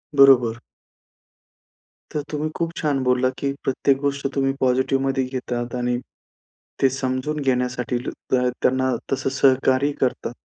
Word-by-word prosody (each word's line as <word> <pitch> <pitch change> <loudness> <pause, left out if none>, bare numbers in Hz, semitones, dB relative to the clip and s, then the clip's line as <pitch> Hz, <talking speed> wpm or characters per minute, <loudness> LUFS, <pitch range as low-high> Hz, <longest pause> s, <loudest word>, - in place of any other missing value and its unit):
बरोबर. 125 -4 +6 1.5
तर 150 - -1
तुम्ही 150 +1 -2
खूप 165 -1 -2
छान 145 -3 0
बोललात, 130 0 +2
की 140 - -1
प्रत्येक 135 +1 +1
गोष्ट 140 -1 -1
तुम्ही 135 -1 +1
पॉझिटिव्हमध्ये 135 +1 +1
घेतात 125 -2 -4
आणि 125 0 0 0.8
ते 135 - +5
समजून 130 +3 -2
घेण्यासाठी 125 -2 -1 0.2
त 125 -1 +3 0.2
त्यांना 130 0 +2 0.2
तसं 135 0 0
सहकार्य 135 +1 +3
करतात. 125 -2 -1
130 Hz, 120 wpm, -22 LUFS, 125-135 Hz, 1.5 s, बरोबर